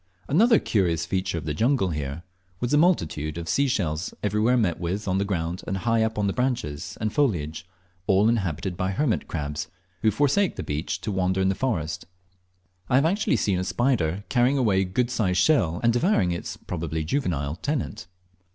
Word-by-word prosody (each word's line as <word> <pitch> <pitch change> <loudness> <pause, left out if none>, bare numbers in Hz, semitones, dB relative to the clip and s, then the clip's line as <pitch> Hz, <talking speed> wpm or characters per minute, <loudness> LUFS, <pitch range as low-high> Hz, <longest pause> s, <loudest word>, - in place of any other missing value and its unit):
Another 225 - +5
curious 85 -6 +1
feature 95 0 -1
of 80 - -5
the 75 - -1
jungle 115 - +2
here 75 0 -4 0.4
was 120 - -2
the 150 - +4
multitude 80 - +1
of 85 -1 -5
sea 140 +10 +2
shells 85 - -1
everywhere 105 +4 +2
met 95 -8 +1
with 95 +4 -3
on 95 0 +1
the 100 - 0
ground 85 -2 -2
and 95 - -1
high 115 +3 +1
up 110 0 0
on 105 - +1
the 100 - 0
branches 120 - -2
and 110 0 -2
foliage, 85 - 0 0.4
all 100 +2 +4
inhabited 95 -5 -1
by 95 +1 -1
hermit 125 +2 0
crabs, 75 -2 -4 0.3
who 110 - +4
forsake 145 - +2
the - - -4
beach 75 +2 -3
to 110 - -3
wander 95 0 0
in 95 0 +2
the - - +2
forest. 85 - -2 0.8
I - - +3
lave 140 +3 +4
actually 195 +6 +2
seen 95 -3 +1
a - - -1
spider 100 -5 0
carrying 125 +2 +2
away 105 -7 +3
a - - +1
good 120 +7 -1
sized 95 -7 0
shell 90 - +3
and 115 0 +4
devouring 120 - +2
its 85 - -5
(probably 80 -2 -4
juvenile) 80 - -1
tenant. 130 - -3
95 Hz, 190 wpm, -25 LUFS, 85-125 Hz, 0.8 s, Another